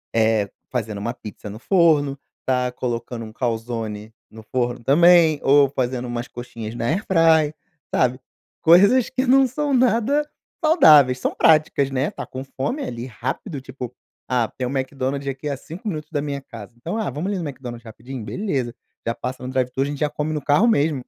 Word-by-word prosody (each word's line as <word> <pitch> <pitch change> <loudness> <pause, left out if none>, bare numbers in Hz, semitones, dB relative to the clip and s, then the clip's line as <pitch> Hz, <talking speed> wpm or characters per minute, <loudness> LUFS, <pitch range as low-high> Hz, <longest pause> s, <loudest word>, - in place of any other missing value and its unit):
eh 110 -3 +2 0.2
fazendo 110 -5 -3
uma 115 +4 -3
pizza 105 -3 -9
no 105 +2 -8
forno, 150 -5 +3 0.3
tá 125 -1 +1
colocando 120 -1 -4
um 110 - -9
calzone 115 -3 -3 0.2
no 110 0 -12
forno 120 0 -2
também, 165 +1 +5
ou 140 0 +5
fazendo 125 -2 -2
umas 120 0 -4
coxinhas 120 -2 -8
na 115 -1 -3
AirFryer, 160 -4 +3 0.4
sabe? 125 0 +2 0.4
Coisas 200 +9 +6
que 260 0 -1
não 270 +1 +5
são 280 +3 -2
nada 255 +4 +2 0.4
saudáveis, 150 - +6
são - - -1
práticas, 155 -3 +3
né, 135 +2 0
está - - -7
com 130 +1 -7
fome 135 - -3
ali 120 +1 -5
rápido, 130 - -5
tipo: 130 -2 -8 0.4
"Ah, 120 -3 +1
tem 125 -1 -2
o 135 - -4
McDonald's 135 +1 -2
aqui 135 +2 -5
há 140 - -1
5 175 - -9
minutos 155 -6 -4
da 145 -3 -1
minha 140 -1 -4
casa, 115 -4 -11
então: 170 - -4
"Ah, 220 - -1
vamos 175 +8 -3
ali 195 - -2
no 165 - -3
McDonald's 125 -4 -8
rapidinho?" 115 +2 -8
Beleza, 125 - -2 0.3
já 115 - 0
passa 125 0 -5
no - - -4
drive-thru, 130 +1 0
a - - -1
gente 145 0 -5
já 150 - +1
come 150 +1 -3
no 150 - -2
carro 150 - +3
mesmo. 145 - +2
135 Hz, 185 wpm, -22 LUFS, 120-160 Hz, 0.4 s, Coisas